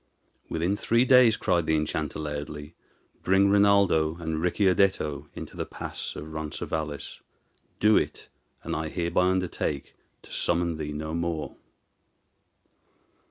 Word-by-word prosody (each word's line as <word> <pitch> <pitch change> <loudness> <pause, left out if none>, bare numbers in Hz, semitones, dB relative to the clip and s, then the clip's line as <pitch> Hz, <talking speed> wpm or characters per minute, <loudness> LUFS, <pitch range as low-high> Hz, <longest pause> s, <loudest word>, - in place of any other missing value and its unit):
"Within 85 +5 0
three 115 +4 +2
days," 125 -3 +6
cried 85 -2 +1
the 80 - +3
enchanter, 75 0 -2
loudly, 75 0 -5 0.5
"bring 95 +1 +3
Rinaldo 100 -6 +4
and 80 -2 -3
Ricciardetto 90 -6 +1
into - - -8
the - - -4
pass - - -6
of 80 +1 -8
Ronces 80 -1 -5
Valles. 75 -3 -4 0.6
Do 105 0 +5
it, - - -2 0.4
and - - -3
I 80 0 -2
hereby 85 +1 +1
undertake 90 -6 -2 0.3
to - - -12
summon 85 -1 0
thee 75 -1 -4
no 80 +1 -4
more." 85 -2 -3
80 Hz, 125 wpm, -27 LUFS, 75-95 Hz, 0.6 s, days